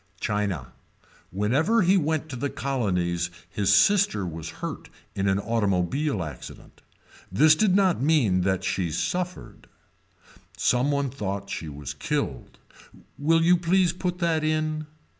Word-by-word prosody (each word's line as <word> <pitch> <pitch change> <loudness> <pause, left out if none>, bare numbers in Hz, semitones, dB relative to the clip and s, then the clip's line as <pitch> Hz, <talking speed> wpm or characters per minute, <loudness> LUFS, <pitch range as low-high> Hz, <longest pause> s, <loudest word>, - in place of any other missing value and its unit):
China. 100 -10 -2 0.6
Whenever 135 - +2
he 185 +3 +4
went 160 -3 0
to 140 - -7
the 140 +4 -2
colonies 90 -12 -1 0.2
his 100 -1 0
sister 145 - +4
was 80 -2 -6
hurt - - -6 0.2
in 100 0 -1
an 95 - +2
automobile 105 - 0
accident. 75 -2 -10 0.5
This 150 +11 +6
did 190 +3 +2
not 190 -6 +3
mean 130 - +3
that 95 0 0
she 90 -3 -1
suffered. 180 - -4 0.9
Some 125 +3 +2
one 140 -2 0
thought 100 -5 -4
she 80 - -5
was 70 -1 -7
killed. 75 - -3 0.6
Will 165 +3 +3
you 175 +2 +5
please 175 0 +2
put 180 0 -3
that 165 -3 0
in. 155 0 -1
135 Hz, 135 wpm, -25 LUFS, -, 0.9 s, This